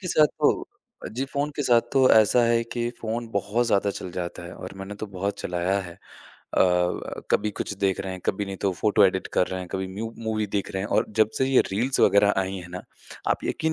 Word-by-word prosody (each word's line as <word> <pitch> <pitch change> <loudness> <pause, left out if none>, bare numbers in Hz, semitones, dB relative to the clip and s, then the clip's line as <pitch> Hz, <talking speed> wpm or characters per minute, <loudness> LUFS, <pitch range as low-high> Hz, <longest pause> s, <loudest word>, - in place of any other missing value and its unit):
के 180 - -5
साथ 155 -3 +5
तो - - +5 0.5
अ, - - -4
जी, 130 +5 -3
फ़ोन 140 +2 -2
के 145 - 0
साथ 120 -3 +5
तो 130 -2 +5
ऐसा 110 +2 +5
है 115 0 +3
कि 120 -1 -1
फ़ोन 115 +1 -3
बहुत 105 +4 0
ज़्यादा 100 -2 +2
चल 95 - -6
जाता 85 -1 -5
है 85 - -8
और 95 +1 -9
मैंने 95 +1 -7
तो 110 - -2
बहुत 100 +2 -2
चलाया 90 +2 0
है। 85 - -10 0.6
अ, - - +6
व 90 -1 0
कभी 105 0 +2
कुछ 105 - -4
देख 95 -1 +1
रहे 95 -1 -4
हैं, 95 - -7
कभी 100 +1 0
नहीं 95 0 -5
तो 95 - +2
फ़ोटो 105 -1 +4
एडिट 95 0 +1
कर 90 - +4
रहे 95 0 -4
हैं, 90 - -7
कभी 95 0 -3
म्यू 115 +3 -4
मूवी 110 -1 -1
देख 100 - -1
रहे 95 0 -2
हैं 105 - -4
और - - +1
जब 110 0 +5
से 130 - +3
ये 135 -1 +5
रील्स 120 +7 0
वग़ैरह 100 +1 +5
आई 95 0 -3
है 90 -1 -8
ना, 90 - -6 0.5
आप - - 0
यकीन 160 0 -1
100 Hz, 245 wpm, -25 LUFS, 95-115 Hz, 0.6 s, अ